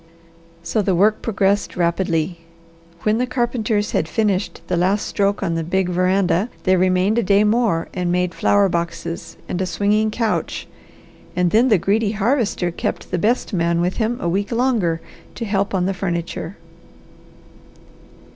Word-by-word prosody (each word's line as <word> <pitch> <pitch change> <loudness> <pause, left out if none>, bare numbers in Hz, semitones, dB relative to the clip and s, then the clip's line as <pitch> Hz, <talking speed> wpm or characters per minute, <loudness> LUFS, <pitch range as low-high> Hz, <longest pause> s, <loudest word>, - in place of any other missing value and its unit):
So 210 +6 0
the 195 -2 +1
work 210 +4 +3
progressed 200 -3 0
rapidly. 170 -1 0 0.6
When 215 +1 +2
the 250 - 0
carpenters 235 -4 -1
had 160 - 0
finished 195 -1 -1
the 180 - -1
last 190 +4 +1
stroke 200 0 0
on 170 - 0
the 165 0 -1
big 180 +2 0
veranda 185 +3 +1
they 185 -1 +4
remained 185 +4 +2
a - - +3
day 200 0 +3
more 210 -6 +1
and 180 -1 -1
made 180 0 0
flower 205 +2 +3
boxes, 170 -1 -4
and 180 - -2
a 185 - -1
swinging 210 +4 +1
couch, 225 0 -2 0.7
and 180 -1 +2
then 230 +4 +4
the 215 -5 +5
greedy 205 +4 +1
Harvester 215 -4 0
kept - - -4
the 180 - 0
best 230 +4 0
man 170 -1 +1
with 180 +2 0
him 230 +1 0
a - - -2
week 195 +6 -1
longer 230 -10 +1 0.3
to 230 - -4
help 200 -1 0
on 180 -1 +1
the 195 - 0
furniture. 175 0 -4
195 Hz, 160 wpm, -20 LUFS, 175-215 Hz, 0.7 s, the